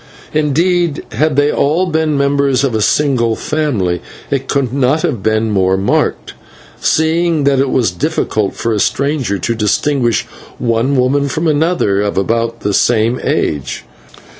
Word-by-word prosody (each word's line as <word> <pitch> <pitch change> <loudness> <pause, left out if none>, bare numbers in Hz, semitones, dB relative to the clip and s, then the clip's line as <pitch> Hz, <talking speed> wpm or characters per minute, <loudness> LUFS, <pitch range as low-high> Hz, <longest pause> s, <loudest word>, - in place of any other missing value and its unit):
Indeed, 165 +2 +1
had 155 -2 0
they 145 +1 +3
all 160 +6 +1
been 160 -3 0
members 140 -1 +1
of 135 -4 0
a 110 - 0
single 120 0 +1
family 110 - -1 0.3
it 135 -1 -2
would 130 -3 0
not 140 +3 +1
have 120 -9 -1
been 110 +1 0
more 95 -1 +2
marked, 95 +1 -1 0.5
seeing 160 0 +1
that 140 -1 +2
it 135 0 +1
was 120 -8 +1
difficult 100 +3 -1
for 115 - -1
a 105 - -1
stranger 140 -5 0
to 115 - -2
distinguish 120 +2 0 0.3
one 120 +3 0
woman 140 +2 +1
from 160 +4 -2
another 150 - +1
of 105 -1 -2
about 115 +3 -1
the 105 - -1
same 115 +3 +2
age. 70 -4 -2
130 Hz, 150 wpm, -15 LUFS, 110-150 Hz, 0.5 s, they